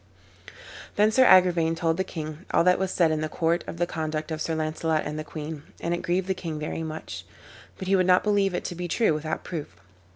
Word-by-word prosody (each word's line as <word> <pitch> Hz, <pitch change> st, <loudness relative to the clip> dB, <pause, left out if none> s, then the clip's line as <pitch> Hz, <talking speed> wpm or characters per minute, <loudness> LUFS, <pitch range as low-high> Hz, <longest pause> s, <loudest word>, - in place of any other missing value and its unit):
Then 210 Hz, +1 st, +4 dB
Sir 260 Hz, +3 st, +5 dB
Agrivain 175 Hz, -5 st, +5 dB
told 165 Hz, -1 st, 0 dB
the 190 Hz, -, +1 dB
king 155 Hz, -1 st, -7 dB
all -, -, +4 dB
that 180 Hz, 0 st, +4 dB
was 190 Hz, 0 st, 0 dB
said 170 Hz, -3 st, +2 dB
in 155 Hz, -1 st, 0 dB
the 155 Hz, -, -2 dB
court 165 Hz, +2 st, 0 dB
of -, -, -6 dB
the 175 Hz, -, +1 dB
conduct 155 Hz, -2 st, -3 dB
of 155 Hz, 0 st, -3 dB
Sir 160 Hz, -, -1 dB
Launcelot 155 Hz, 0 st, -1 dB
and 150 Hz, +1 st, -4 dB
the -, -, -3 dB
queen, 155 Hz, 0 st, -6 dB, 0.2 s
and 170 Hz, -, -1 dB
it 175 Hz, -, -2 dB
grieved 180 Hz, +2 st, 0 dB
the 190 Hz, -, +1 dB
king 165 Hz, -4 st, -5 dB
very 155 Hz, +2 st, -4 dB
much. 160 Hz, 0 st, -6 dB, 0.5 s
But 190 Hz, -, -6 dB
he 195 Hz, -, +4 dB
would 185 Hz, -1 st, +3 dB
not 180 Hz, 0 st, +5 dB
believe 200 Hz, -3 st, +2 dB
it -, -, -2 dB
to -, -, -3 dB
be 175 Hz, 0 st, -4 dB
true 215 Hz, 0 st, +2 dB
without 155 Hz, +1 st, -3 dB
proof. 150 Hz, -, -6 dB
165 Hz, 235 wpm, -26 LUFS, 155-180 Hz, 0.5 s, Sir